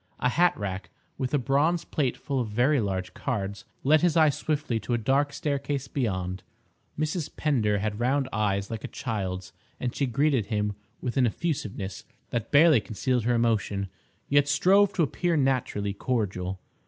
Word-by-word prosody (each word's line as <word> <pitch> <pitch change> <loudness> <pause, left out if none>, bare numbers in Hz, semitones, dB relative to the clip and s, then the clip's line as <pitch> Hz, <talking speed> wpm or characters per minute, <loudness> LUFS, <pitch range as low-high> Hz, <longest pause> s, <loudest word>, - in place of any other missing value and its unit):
A 125 - +2
hat 175 +7 +3
rack, 100 -2 -4 0.3
with 130 -1 -1
a 145 - +3
bronze 145 +6 +1
plate 135 -5 -1
full 140 -1 -2
of 120 - -1
very 125 +7 +3
large 95 -4 -2
cards, 100 -6 -3 0.2
led 155 +3 +5
his 170 -2 +3
eye 155 -2 +6
swiftly 145 -5 -1
to 115 +3 -1
a - - +1
dark 135 +5 +1
staircase 140 -2 -2
beyond. 95 -9 -2 0.6
Mrs. 155 +1 -1
Pender 115 -9 +2
had 105 +1 -2
round 130 +3 +1
eyes 100 -2 0
like 110 -1 -5
a - - -3
child's, 95 -5 -4 0.3
and 125 - -3
she 140 - 0
greeted 135 -2 +1
him 105 -2 0 0.3
with 125 +1 -3
an 125 -2 +5
effusiveness 105 - -3 0.3
that 115 -3 -2
barely 150 -4 +6
concealed 120 +2 -1
her 120 0 +3
emotion, 105 -4 0 0.4
yet 145 0 +4
strove 190 +8 +4
to 170 - +2
appear 170 +3 0
naturally 130 -7 0
cordial. 95 -5 -2
125 Hz, 165 wpm, -27 LUFS, 105-145 Hz, 0.6 s, eye